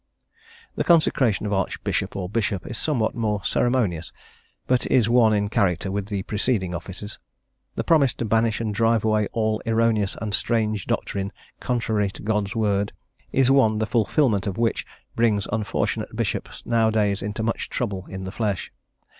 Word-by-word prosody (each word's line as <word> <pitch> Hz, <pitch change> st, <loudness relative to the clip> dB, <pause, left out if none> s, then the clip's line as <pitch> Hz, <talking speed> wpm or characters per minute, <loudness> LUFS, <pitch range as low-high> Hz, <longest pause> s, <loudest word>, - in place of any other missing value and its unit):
The -, -, 0 dB
Consecration 135 Hz, -, +3 dB
of 105 Hz, -, -1 dB
Archbishop 95 Hz, -1 st, -1 dB
or 95 Hz, -2 st, -3 dB
Bishop 100 Hz, -2 st, -1 dB
is 120 Hz, -, -5 dB
somewhat 120 Hz, -5 st, 0 dB
more 105 Hz, -3 st, -1 dB
ceremonious, 100 Hz, -10 st, 0 dB, 0.5 s
but 125 Hz, -1 st, +1 dB
is 120 Hz, -4 st, +3 dB
one 115 Hz, -2 st, +5 dB
in 105 Hz, -1 st, +1 dB
character 95 Hz, -4 st, 0 dB
with 100 Hz, 0 st, -2 dB
the 100 Hz, -3 st, -3 dB
preceding 105 Hz, -4 st, -1 dB
offices. 95 Hz, +4 st, -7 dB, 0.6 s
The -, -, -1 dB
promise 145 Hz, -6 st, +4 dB
to 120 Hz, -, -3 dB
banish 110 Hz, 0 st, +2 dB
and 110 Hz, -2 st, -2 dB
drive 115 Hz, +1 st, +2 dB
away 110 Hz, -1 st, +2 dB
all 110 Hz, -1 st, 0 dB
erroneous 115 Hz, -3 st, +2 dB
and 105 Hz, -2 st, -4 dB
strange 110 Hz, -3 st, 0 dB
doctrine 100 Hz, 0 st, -2 dB, 0.3 s
contrary 110 Hz, -5 st, 0 dB
to -, -, -10 dB
God's 105 Hz, 0 st, -1 dB
word 105 Hz, -2 st, 0 dB, 0.4 s
is 135 Hz, -1 st, +3 dB
one 110 Hz, -6 st, +4 dB
the 110 Hz, -, 0 dB
fulfilment 110 Hz, -1 st, +1 dB
of 100 Hz, +1 st, -3 dB
which 115 Hz, -1 st, 0 dB, 0.3 s
brings 110 Hz, -3 st, +2 dB
unfortunate 110 Hz, -2 st, -2 dB
bishops -, -, -3 dB
nowadays 110 Hz, -3 st, +2 dB
into 105 Hz, +2 st, -3 dB
much 115 Hz, +1 st, -2 dB
trouble 100 Hz, -6 st, -3 dB
in 95 Hz, 0 st, -6 dB
the 95 Hz, -, -5 dB
flesh. 105 Hz, -3 st, -2 dB
110 Hz, 160 wpm, -24 LUFS, 100-115 Hz, 0.6 s, one